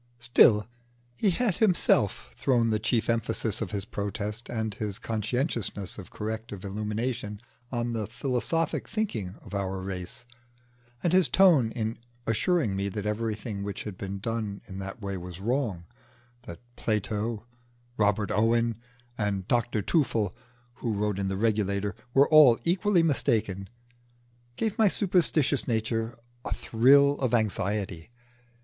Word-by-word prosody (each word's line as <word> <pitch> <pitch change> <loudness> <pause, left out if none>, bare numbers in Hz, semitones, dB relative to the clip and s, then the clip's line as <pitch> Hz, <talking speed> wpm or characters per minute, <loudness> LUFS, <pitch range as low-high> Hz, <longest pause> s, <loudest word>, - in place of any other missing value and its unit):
Still, 115 -3 +5 0.5
he 200 - +2
had 205 +1 +1
himself 170 - +2
thrown 120 - +2
the 110 - +1
chief 115 +1 0
emphasis 115 -2 0
of 105 - -2
his 100 -2 -3
protest 105 +2 -4
and 110 -2 -2
his 105 -1 -4
consciousness 110 - -2
of 95 - -9
corrective 110 -2 -5
illumination 105 +2 -3 0.3
on 120 -1 -1
the 110 -3 -2
philosophic 135 +7 -1
thinking 115 - -2
of - - -11
our 95 -1 -2
race; 95 +6 -6 0.8
and 175 - +2
his 185 -1 +5
tone 170 -12 +5
in 115 -1 -3 0.3
assuring 115 - +1
me 100 +1 -1
that 105 +1 -5
everything 105 -1 -2
which 100 0 -4
had 105 -3 -6
been 100 +1 -5
done 110 -1 -3
in 95 -1 -8
that 95 +3 -7
way 100 -1 -3
was 90 0 -8
wrong 110 -5 -1 0.6
that 85 - -8 0.2
Plato, 110 +1 -2 0.5
Robert 105 -1 +1
Owen, 115 +1 +2 0.4
and 100 -3 -1
Dr 120 -3 +1
Tuffle 115 - +1 0.4
who 115 -3 -2
wrote 105 -1 -1
in 100 - -1
the 95 0 -2
'Regulator,' 100 -2 0 0.2
were 140 +1 +6
all 150 -7 +8
equally 180 +1 +3
mistaken 110 - 0 0.9
gave 220 - -2
my 220 - +6
superstitious 170 -8 +2
nature 115 0 -1 0.3
a - - -2
thrill 140 +5 +4
of 125 -3 +2
anxiety. 100 -5 -1
110 Hz, 135 wpm, -28 LUFS, 100-125 Hz, 0.9 s, all